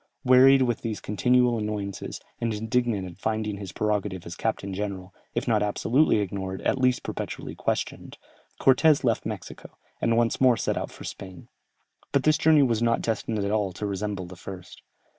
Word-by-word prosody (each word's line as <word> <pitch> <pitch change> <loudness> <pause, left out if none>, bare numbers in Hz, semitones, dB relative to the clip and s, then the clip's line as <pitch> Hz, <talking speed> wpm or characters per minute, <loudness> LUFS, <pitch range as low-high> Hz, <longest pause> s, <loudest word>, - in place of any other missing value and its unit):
Wearied 130 +1 +7
with 120 -3 -1
these 110 -3 -3
continual, 120 +4 +2
annoyances, 105 -2 -4 0.2
and 115 - -1
indignant 110 -2 0
at 85 - -12
finding 110 -2 -2
his 100 -2 -7
prerogative 105 -4 -2
as 85 - -7
captain 100 -3 -2
general, 95 -2 -5 0.2
if - - -2
not 110 -3 +3
absolutely 115 +7 +2
ignored, 95 -1 -4
at 135 - +1
least 125 -1 +2
perpetually - - -5
questioned, - - -3 0.4
Cortès 140 +3 +4
left 115 -3 +1
Mexico, - - -8 0.2
and 115 0 +2
once 120 +1 +1
more 125 -3 +5
set - - -1
out - - -3
for - - -12
Spain. 95 -2 -9 0.6
But 140 - +3
this 155 0 +3
journey 155 -2 +5
was 115 -4 +1
not 115 0 +1
destined 110 0 -1
at 100 0 -1
all 105 -3 0
to 105 - -5
resemble 100 -1 -3
the 90 +1 -10
first. 95 0 -10
110 Hz, 175 wpm, -26 LUFS, 100-125 Hz, 0.6 s, Wearied